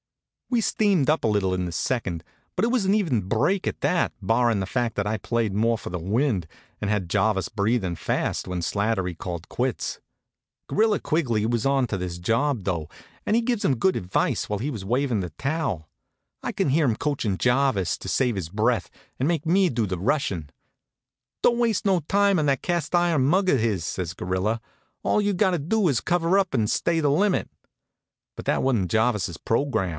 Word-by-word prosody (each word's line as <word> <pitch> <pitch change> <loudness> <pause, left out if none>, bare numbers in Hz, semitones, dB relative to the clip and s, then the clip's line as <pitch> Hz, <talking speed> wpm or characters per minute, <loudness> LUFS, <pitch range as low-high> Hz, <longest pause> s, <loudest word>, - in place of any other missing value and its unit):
We 245 -2 +2
steamed 200 -10 +2
up 155 - +2
a - - +2
little 100 -3 +1
in 90 0 -1
the 85 - -4
second; 90 -2 -2 0.3
but 190 - +2
it - - +1
was 245 -3 +1
an 195 +1 +2
even 165 - +1
break 180 - +1
at - - -2
that, 180 - +1
barrin' 115 +2 +2
the 95 - -1
fact 120 +3 -1
that 100 0 -1
I 110 +1 0
played 115 -3 -1
more 115 +3 +2
for - - -7
the 90 - -3
wind, 105 - 0 0.4
and 105 - -1
had 100 -5 -1
Jarvis 95 -1 +1
breathin' 100 -3 0
fast - - -2
when 90 -1 -2
Slattery 95 -2 -1
called 85 -1 -6
quits. 125 -1 -2 0.7
Gorilla 215 -1 +2
Quigley 120 -10 0
was 115 0 0
onto 135 -6 +1
his 90 -1 -4
job, 115 +6 0
though, 85 -5 -2 0.4
an' 210 - +2
he 235 - +3
gives 235 -2 -1
him 130 - +2
good 190 +9 +2
advice 90 +1 -1
while 105 -1 -1
he 135 +7 -2
was 110 -7 -6
wavin' 120 +1 0
the 90 - -4
towel. 135 - -2 0.6
I - - -2
could - - 0
hear 155 +4 +3
him 115 -4 +1
coachin' 135 -10 -1
Jarvis 125 -6 +1
to 95 - -6
save 125 +2 +1
his 90 -4 -4
breath 110 +3 0 0.3
and 135 +5 +1
make 165 -2 -1
me 185 +3 +3
do 115 -5 0
the 90 -3 -3
rushin'. 95 - -1 0.9
"Don't 240 0 +4
waste 230 -4 +1
no 190 -3 +3
time 200 +4 +2
on 150 - +1
that 135 -2 +1
cast 170 -3 -1
iron 175 -5 +3
mug 185 +8 +2
of 140 - +4
his," 105 -7 0
says 90 0 -3
Gorilla. 95 +5 -1 0.4
"All 210 - +2
you 205 0 +1
gotter 185 -2 +2
do 190 +7 +1
is 135 -7 +1
cover 175 +1 +2
up 190 -2 +1
an' 110 -5 +2
stay 165 +9 +1
the 145 -3 +2
limit." 195 +6 +1 0.9
But - - -7
that - - +1
wa'n't 115 -9 +1
Jarvis's 110 -7 +1
program. 115 -6 0
120 Hz, 200 wpm, -25 LUFS, 100-165 Hz, 0.9 s, Don't